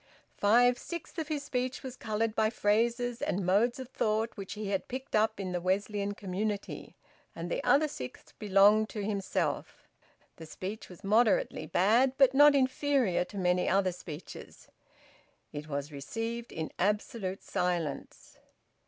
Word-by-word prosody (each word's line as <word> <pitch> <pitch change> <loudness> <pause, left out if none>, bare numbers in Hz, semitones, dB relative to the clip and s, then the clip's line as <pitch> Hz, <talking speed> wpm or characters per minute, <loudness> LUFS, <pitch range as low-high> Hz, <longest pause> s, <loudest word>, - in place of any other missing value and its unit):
Five 245 +4 +4
sixths 340 0 -7
of 315 - -3
his 300 -2 -2
speech 255 -2 -3
was 260 -1 -6
coloured 220 0 -1
by 220 0 +2
phrases 235 +3 0
and 185 0 -1
modes 210 +6 +3
of 260 -2 -7
thought 220 -2 -1
which 195 -2 -6
he 210 -1 -5
had 195 -1 -1
picked 260 +1 -5
up 220 0 +2
in 185 -2 -3
the 175 -1 -2
Wesleyan 200 +2 -1
community, 200 +1 -4 0.4
and - - -5
the - - -1
other 300 +2 +4
sixth 125 - -9
belonged 210 +1 +5
to 210 - -5
himself. 200 -2 -2 0.5
The 160 - -10
speech 195 +6 -7
was 180 +2 -13
moderately 210 -6 +2
bad, 225 - +3
but 270 -2 +5
not 290 +1 +7
inferior 260 -7 +2
to 200 - -10
many 180 -1 +1
other 190 -1 +2
speeches. 170 -2 -10 0.8
It 150 +1 -6
was 145 0 -4
received 225 +12 -5
in 160 -1 -4
absolute 205 0 -1
silence. 175 -4 -3
210 Hz, 150 wpm, -30 LUFS, 185-245 Hz, 0.8 s, not